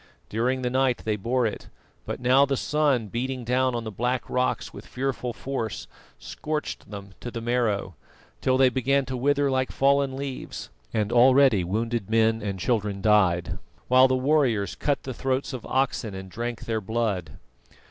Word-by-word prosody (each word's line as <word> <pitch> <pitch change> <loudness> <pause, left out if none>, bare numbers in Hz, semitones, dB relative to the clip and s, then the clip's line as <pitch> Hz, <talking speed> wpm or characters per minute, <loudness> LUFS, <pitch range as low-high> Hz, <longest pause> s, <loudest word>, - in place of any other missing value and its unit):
During 125 +4 0
the 125 - 0
night 130 -1 +1
they 110 -1 +1
bore 120 +5 0
it; 110 - -4 0.4
but - - -4
now 130 +3 +5
the 140 -1 +1
sun 145 -6 +1
beating 125 +4 -3
down 125 +1 +1
on 120 - -2
the 110 - -5
black 125 +5 -1
rocks 125 0 -1
with - - -10
fearful 125 -1 -3
force 115 -3 -4 0.3
scorched 155 0 -5
them 100 -2 -8
to 120 - -6
the 115 - -5
marrow, 115 -5 0 0.5
till 130 0 +2
they 130 -1 +5
began 135 +2 +1
to 130 +1 -4
wither 140 +2 +2
like 130 0 0
fallen 140 -1 +2
leaves, 135 -2 -6 0.2
and 105 0 -1
already 130 -4 +5
wounded 110 +3 -2
men 110 0 +3
and 100 -2 -3
children 105 -3 0
died, 95 -5 +2 0.3
while 130 +1 +7
the 130 - +1
warriors 130 -6 +2
cut 145 -1 -1
the 130 - -5
throats 130 +3 -2
of 125 - -6
oxen 130 -6 0
and 95 0 -8
drank 120 +1 -4
their 110 -1 -1
blood. 100 - -2
125 Hz, 170 wpm, -25 LUFS, 110-130 Hz, 0.5 s, while